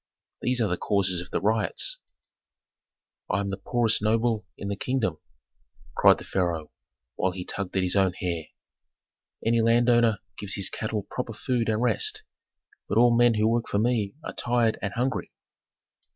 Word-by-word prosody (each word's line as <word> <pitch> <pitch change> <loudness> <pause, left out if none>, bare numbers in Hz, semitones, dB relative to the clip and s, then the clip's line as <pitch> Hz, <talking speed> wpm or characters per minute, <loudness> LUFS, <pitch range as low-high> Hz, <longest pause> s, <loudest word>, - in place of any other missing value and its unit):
These 125 0 +1
are 110 - +3
the 90 -2 -1
causes 95 -3 0
of 90 - -4
riots." 110 - +1 1.3
"I 100 - +1
am 100 -1 -2
the 95 - -3
poorest 120 -3 +1
noble 110 0 +1
in 100 - -6
the 100 - -2
kingdom!" 110 -8 -1 0.8
cried - - +6
the - - -9
pharaoh, 85 -5 -2 0.5
while 95 -1 0
he 90 0 -6
tugged 100 -1 -4
at 95 - +2
his 90 +1 0
own 95 -2 +3
hair. 85 -3 -3 1.0
"Any 115 0 +3
landowner 120 -1 +4 0.2
gives 100 -2 -2
his 100 - -1
cattle 110 -2 -3
proper 125 -2 -4
food 115 +2 -1
and 110 +2 +1
rest; 115 -5 0 0.7
but 105 - 0
all 120 0 +6
men 120 -1 +5
who 105 0 +2
work 115 +1 +1
for - - -1
me 110 -1 +1
are - - -5
tired 120 -2 +1
and 100 - -2
hungry. 125 +3 -2
110 Hz, 165 wpm, -26 LUFS, 100-120 Hz, 1.3 s, cried